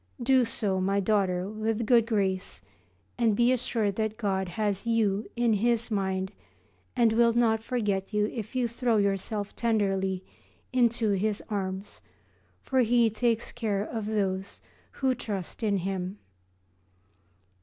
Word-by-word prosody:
Do 260 0 +4
so, 205 -5 -1
my 195 +2 +1
daughter, 190 -3 +1
with 215 +1 -2
a - - 0
good 230 0 +4
grace, 190 - -1 0.6
and 225 -3 +3
be 240 +3 +4
assured 225 -5 0
that 220 -1 -1
God 190 -4 -1
has 205 +3 -2
you 215 -3 +1
in 240 -2 +2
His 235 +2 +1
mind 190 -2 -1 0.6
and 235 -3 +4
will 235 0 +4
not 225 -2 +2
forget 210 -5 -1
you 210 -1 +2
if 225 0 -6
you 250 -2 +2
throw 235 -1 0
yourself 200 +1 -1
tenderly 195 -5 0 0.5
into 235 -3 +2
His 205 +2 0
arms, 195 -1 -4 0.6
for 265 - +1
He 235 -1 +4
takes 230 +1 0
care 210 -5 -1
of 220 -1 -4
those 195 -2 -2 0.3
who 265 -1 +1
trust 205 -7 -5
in 205 -3 +1
Him. 190 +1 -3
215 Hz, 140 wpm, -28 LUFS, 195-235 Hz, 0.6 s, Do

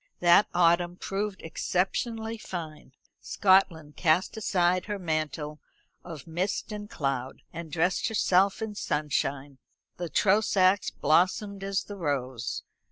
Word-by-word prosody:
That 175 +3 +6
autumn 175 0 +3
proved 195 +1 -4
exceptionally 220 +7 -2
fine. 155 -8 -7 0.3
Scotland 180 -6 +2
cast 175 +4 +2
aside 185 -4 +1
her 210 -1 -3
mantle 155 -3 -3 0.4
of 160 -6 -9
mist 180 +6 -2
and 210 0 -6
cloud, 135 -2 -3
and 165 -2 -7
dressed 175 +4 +1
herself 200 -2 +2
in 220 -1 -4
sunshine. 145 -5 -2 0.4
The 175 -1 -4
Trosachs 195 -1 +3
blossomed 190 +6 +1
as 195 0 -1
the 205 - -9
rose. 130 -6 -3
175 Hz, 115 wpm, -28 LUFS, 155-195 Hz, 0.4 s, That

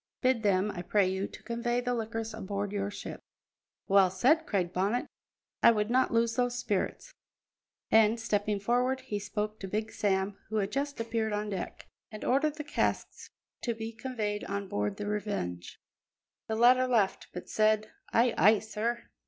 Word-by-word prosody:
Bid 255 -2 +3
them, 200 -1 +2
I 175 - -5
pray 195 +2 +2
you, 190 +1 -1
to - - -13
convey 240 +1 -1
the 245 0 -1
liquors 225 -1 -3
aboard 200 -1 -3
your 200 -1 -2
ship." 205 - -7 0.7
"Well 195 -1 +5
said!" 265 - +3
cried 185 -4 0
Bonnet. 200 +7 0 0.6
"I - - +8
would 215 -1 +1
not 260 +1 +3
lose 230 0 +2
those 245 0 +1
spirits." 230 - -2 0.8
And, 220 +1 +5
stepping 205 -2 0
forward, 250 +5 +1
he 215 -6 -4
spoke 210 +1 -3
to 195 - -5
Big 215 +3 -2
Sam, 200 -1 0
who 220 - -4
had 205 -1 0
just 280 +3 -2
appeared 225 -1 -1
on 210 0 -2
deck, 185 -3 -5 0.3
and 215 - -7
ordered 285 +4 +2
the 305 - -5
casks 295 - -2 0.3
to 235 -2 -1
be 225 0 -5
conveyed 220 -3 -3
on 200 0 -3
board 205 0 -2
the 210 - -4
Revenge. 200 - -3 0.7
The 220 - -1
latter 250 +3 +5
laughed, 220 -6 +1
but 180 - -7
said: 215 0 +2 0.2
"Ay, 235 0 +3
ay, 215 +3 +7
sir!" 220 +3 -3
215 Hz, 170 wpm, -30 LUFS, 200-235 Hz, 0.8 s, I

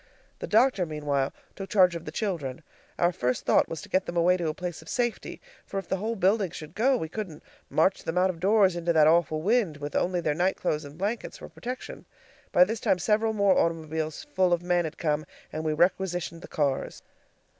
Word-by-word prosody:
The - - -5
doctor 225 -2 +3
meanwhile 145 -3 -1 0.2
took 195 -1 -7
charge 180 -4 +4
of 165 - -6
the 150 - -6
children. 160 - -3 0.3
Our 175 0 +3
first 125 -6 -2
thought - - +3
was 165 0 -6
to - - -10
get 190 0 +1
them 170 - -4
away 175 +2 +4
to 175 -3 -2
a - - -2
place 175 -3 -5
of 160 - -13
safety, 240 -2 -2 0.2
for 195 - -6
if 195 - -4
the 190 - -1
whole 220 +4 -2
building 195 0 +2
should 155 -1 -9
go, 255 +6 +3
we 160 - -3
couldn't 175 -3 -6 0.3
march 185 +5 +2
them 165 +2 -3
out 185 +1 +3
of 170 - -13
doors 195 -1 +4
into 170 0 0
that 155 -2 +6
awful 155 -1 +3
wind, 205 -7 +2
with 145 0 -6
only 180 0 +1
their 155 -3 0
night 180 +5 +1
clothes 155 -4 -1
and 145 +2 -11
blankets 210 +5 -3
for - - -10
protection. 250 +1 -7 0.5
By 180 - +7
this 220 +4 -2
time 185 - +2
several 220 +5 +1
more 200 -3 +3
automobiles 160 -1 -1
full 185 0 +3
of 175 0 0
men 175 -1 +1
had 155 - -6
come, 150 -2 0 0.3
and 155 - -3
we 155 - 0
requisitioned 175 0 0
the - - -10
cars. 140 -3 -2
175 Hz, 220 wpm, -27 LUFS, 155-195 Hz, 0.5 s, By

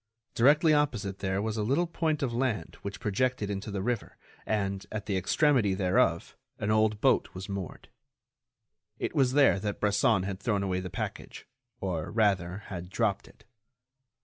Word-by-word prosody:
Directly 150 +6 +5
opposite 115 -10 0
there 95 +1 -1
was 110 0 -2
a - - 0
little 135 +11 +1
point 160 -3 -1
of 125 -3 -1
land 115 -8 -1
which 100 0 -6
projected 105 0 0
into 100 +1 -4
the 100 -2 -3
river 120 -1 -3 0.3
and, 100 -2 -1
at 110 -1 -4
the 100 -2 -1
extremity 105 - +2
thereof, 90 -3 +1 0.2
an 105 - -1
old 110 -1 +2
boat - - +2
was 95 0 -6
moored. 100 -4 -6 1.1
It - - -3
was 130 -3 +2
there 140 -8 +5
that 105 0 -3
Bresson 105 0 +2
had 95 0 -4
thrown 100 -2 0
away 95 -1 -1
the 90 0 -5
package, - - -6 0.3
or, 85 -5 -3
rather, 100 -3 +1
had 90 -2 -7
dropped 105 0 -1
it. - - -20
105 Hz, 165 wpm, -29 LUFS, 95-120 Hz, 1.1 s, Directly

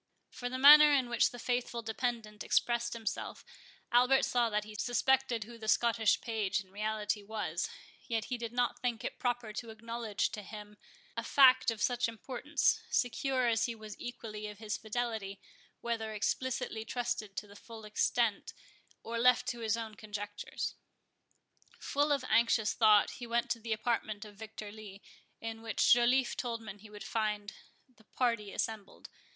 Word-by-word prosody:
From 245 0 -5
the 255 - -2
manner 295 +2 +10
in 265 -4 +2
which 235 -1 +3
the 245 - -10
faithful 240 -1 -2
dependent 220 -2 -3
expressed 235 0 +1
himself, 225 -3 -5 0.5
Albert 250 +2 +5
saw 240 -2 +2
that 210 -1 0
he 215 0 -10
suspected 245 +1 +1
who 230 +2 -12
the 220 - -7
Scottish 225 -1 +3
page 215 -4 -1
in 190 -1 -11
reality 210 +1 -2
was; 210 +1 -3 0.4
yet 225 -4 -1
he 250 - -3
did 230 -1 -4
not 245 0 0
think 240 -3 -2
it - - -5
proper 245 -3 -1
to 230 +2 -6
acknowledge 225 -1 -3
to 210 - -6
him 210 +1 -10 0.4
a 230 - -1
fact 260 0 +6
of 225 -2 -2
such 245 -1 +2
importance, 255 +6 0
secure 255 +1 +1
as 230 -1 +2
he 235 - -3
was 215 -1 -9
equally 215 -3 -6
of 210 -1 -9
his 210 -1 -3
fidelity, 220 -3 -3 0.4
whether 225 -2 -2
explicitly 225 +1 -2
trusted 220 -4 -3
to - - -3
the 200 0 -15
full 225 0 -11
extent, 215 +1 0 0.5
or 230 0 -3
left 250 +1 +5
to 240 - -4
his 225 -1 0
own 225 -1 -5
conjectures. 205 -1 -5 1.0
Full 290 +1 0
of 275 -3 +1
anxious 230 -2 +3
thought, 215 -2 +5
he 240 - -8
went 235 0 0
to 230 - 0
the 225 0 -6
apartment 215 -1 -1
of 210 - -12
Victor 215 0 -8
Lee, 205 -2 -11 0.4
in 225 0 -6
which 225 -1 +4
Joliffe 245 +2 +3
told 235 -5 -4
him 205 0 -8
he 215 +1 -14
would 210 0 -9
find 210 -1 -2 0.3
the 245 -4 -24
party 230 -5 -1
assembled. 215 -2 -4
225 Hz, 170 wpm, -32 LUFS, 215-245 Hz, 1.0 s, manner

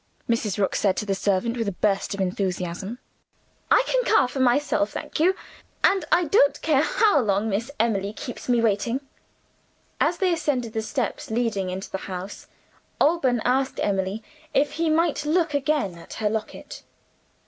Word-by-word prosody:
Mrs. 230 -4 0
Rook 200 -2 0
said 195 -3 +1
to 210 - -2
the 200 - 0
servant, 200 +4 0
with 230 -2 -1
a - - 0
burst 200 +1 0
of - - -9
enthusiasm. 185 +2 -2 0.7
"I - - +5
can - - +1
carve 435 - +3
for 275 - -4
myself, 255 -4 +2
thank - - -6
you; 365 +4 +4 0.5
and 385 -1 +3
I 355 - +5
don't 290 -3 +3
care 300 -4 +3
how 435 -4 +3
long 205 -3 +1
Miss 220 +6 -2
Emily 205 -3 +1
keeps 245 +3 -8
me 240 -1 +3
waiting." 230 +4 0 1.0
As - - +2
they 370 -3 +2
ascended 260 -8 -1
the 220 - -1
steps 235 0 -3
leading 220 -5 -1
into 185 +2 -6
the 190 - -3
house, 185 +2 -7 0.5
Alban 270 -7 +2
asked 260 +2 +1
Emily 195 +2 -1 0.3
if 285 +1 +3
he 330 0 -1
might 315 -1 +1
look 320 +1 +1
again 285 - 0
at - - -11
her 210 -2 0
locket. 220 -1 -5
230 Hz, 170 wpm, -24 LUFS, 200-295 Hz, 1.0 s, I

